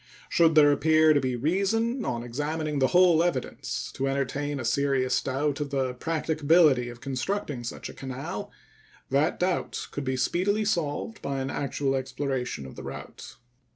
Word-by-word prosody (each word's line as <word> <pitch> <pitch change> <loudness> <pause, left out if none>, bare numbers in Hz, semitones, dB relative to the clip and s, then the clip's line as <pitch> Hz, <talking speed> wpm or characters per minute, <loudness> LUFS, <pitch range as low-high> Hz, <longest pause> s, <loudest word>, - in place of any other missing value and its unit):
Should 165 -2 +4
there 145 -1 +7
appear 155 +1 +4
to 145 - +3
be 130 -1 -1
reason, 200 - 0
on 120 0 -2
examining 150 +4 -2
the 130 - +4
whole 175 -1 +5
evidence, 170 -7 -2
to 135 - -2
entertain 140 +1 -2
a 125 - -4
serious 130 0 +1
doubt 140 +2 -1
of 145 -1 -3
the 130 -2 -1
practicability 155 -2 +2
of 120 0 -11
constructing 135 +1 -3
such 120 - -6
a - - -9
canal, 130 0 -6 0.6
that 140 +4 +2
doubt 180 0 -1
could 145 - -4
be 130 -1 -1
speedily 195 +11 +1
solved 170 +3 -2
by 140 -1 -2
an 135 0 -3
actual 140 -1 -1
exploration 130 - -3
of 65 - -10
the - - -8
route. - - -9
145 Hz, 160 wpm, -27 LUFS, 130-160 Hz, 0.6 s, there